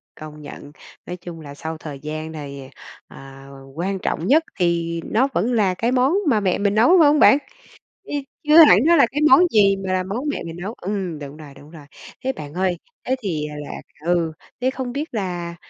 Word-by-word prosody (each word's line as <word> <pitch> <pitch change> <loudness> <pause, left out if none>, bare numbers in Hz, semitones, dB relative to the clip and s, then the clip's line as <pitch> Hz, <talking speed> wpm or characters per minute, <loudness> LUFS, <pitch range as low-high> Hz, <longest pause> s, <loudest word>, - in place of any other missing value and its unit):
công 150 0 -11
nhận! 145 0 -11 0.3
Nói 180 - -5
chung 170 -2 -10
là 140 -2 -10
sau 160 +3 -6
thời 150 -3 -8
gian 155 +2 -6
này, 140 -3 -8 0.4
à, 135 0 -13 0.3
quan 190 +5 -2
trọng 175 -2 -3
nhất 300 +8 +4 0.2
thì 170 -2 0
nó 260 +5 +1
vẫn 245 - 0
là 205 -6 +2
cái 230 +6 -1
món 260 +3 +3 0.2
mà 220 -5 +3
mẹ 190 -3 0
mình 200 0 +1
nấu, 220 +5 +4
phải 315 - +6
hông 295 +1 +3
bạn? 275 - +6 0.7
Ư, - - -9 0.3
chưa 300 +1 +5
hẳn 200 - +7
nó 340 +1 +5
là 280 - +6
cái 295 - -2
món 265 - +8
gì 200 -2 +4
mà 185 0 0
món 205 +9 -4
mẹ 290 - -3
mình 165 0 -7
nấu? 205 +4 -5
Ừm, 190 -7 -4
đúng 145 +1 -9
rồi, 150 -3 -12
đúng 145 +2 -16
rồi. 155 -4 -13 0.4
Thế 265 - 0
bạn 145 - -9
ơi 180 0 0 0.3
thế 260 - 0
thì 160 -8 -3 0.2
là - - -8 0.3
ừ, 170 -2 +1 0.3
thế 255 - +2
không 260 -2 -5
biết 295 +1 -5
là, 175 -5 -4
180 Hz, 210 wpm, -21 LUFS, 155-235 Hz, 0.7 s, món